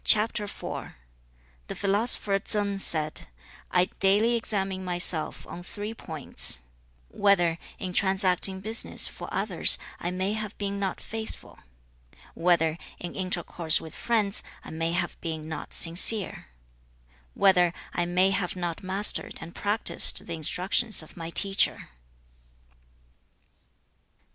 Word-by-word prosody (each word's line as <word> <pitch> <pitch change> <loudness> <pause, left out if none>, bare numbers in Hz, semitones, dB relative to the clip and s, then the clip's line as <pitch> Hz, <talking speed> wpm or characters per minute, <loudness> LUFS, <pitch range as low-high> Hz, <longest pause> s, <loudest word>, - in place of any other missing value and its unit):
The 210 -1 -1 0.8
philosopher 200 0 0
Tsang 200 0 -2
said, 155 -4 -1 0.4
'I 180 0 +2
daily 205 +5 +2
examine 195 -4 -2
myself 175 -3 +5
on 175 - -10
three 205 +4 -7
points: 155 - +4 0.5
whether, 175 - +1 0.2
in 185 -1 -6
transacting 190 0 +2
business 220 +3 +4
for - - -10
others, - - +1 0.2
I 175 - -4
may 185 +3 -3
have 215 -1 -6
been 200 0 -4
not 195 -2 -4
faithful; 220 0 -9 0.7
whether, 165 -2 0 0.2
in 175 - -8
intercourse 175 -3 -1
with 160 - -11
friends, 215 -4 -1 0.2
I - - -11
may 165 +1 -3
have 175 0 -3
been 160 -2 -6
not 160 -2 -8
sincere; 180 - +4 0.9
whether 180 -3 +3 0.2
I 175 - -1
may 185 +2 +1
have 190 -2 -2
not 175 -2 -5
mastered 195 +2 -2
and 165 +1 -11
practised 205 +2 +3
the 170 - -7
instructions 180 +6 -1
of 155 - -17
my 165 -1 -8
teacher.' 195 +3 -2
185 Hz, 115 wpm, -25 LUFS, 170-200 Hz, 0.9 s, myself